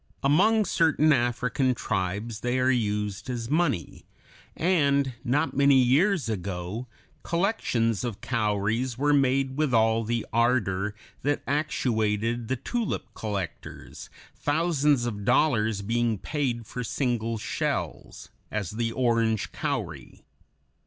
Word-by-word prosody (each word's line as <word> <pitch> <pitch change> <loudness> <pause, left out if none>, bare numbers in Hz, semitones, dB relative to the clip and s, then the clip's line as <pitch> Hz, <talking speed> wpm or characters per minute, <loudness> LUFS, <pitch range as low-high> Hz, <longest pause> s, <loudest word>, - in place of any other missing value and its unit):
Among 205 +10 +4
certain 155 -3 +3
African 125 +1 +1
tribes 105 +3 -2
they 125 +2 -1
are 130 0 +3
used 105 -2 -1
as 120 0 -4
money, 155 - 0 0.5
and 140 -6 +2
not 145 +6 0
many 140 0 +5
years 140 - +3
ago 95 +2 -4 0.3
collections 145 - 0
of 120 -5 -4
cowries 110 +1 -1
were 145 +2 +2
made 135 -1 +2
with 150 -5 +1
all 110 0 +3
the 115 +1 -2
ardor 105 -4 +1 0.3
that 145 +1 0
actuated 115 -6 0
the 130 - 0
tulip 230 - -3
collectors, 100 -6 -6 0.3
thousands 145 -4 +1
of 105 -4 -4
dollars 110 -4 +2
being 115 +1 0
paid 120 0 -2
for 125 +3 -5
single 115 -3 -1
shells, 105 - -4 0.2
as 105 -5 -3
the 115 +1 -2
orange 115 -3 +1
cowry. 110 - -4
120 Hz, 115 wpm, -26 LUFS, 110-140 Hz, 0.5 s, many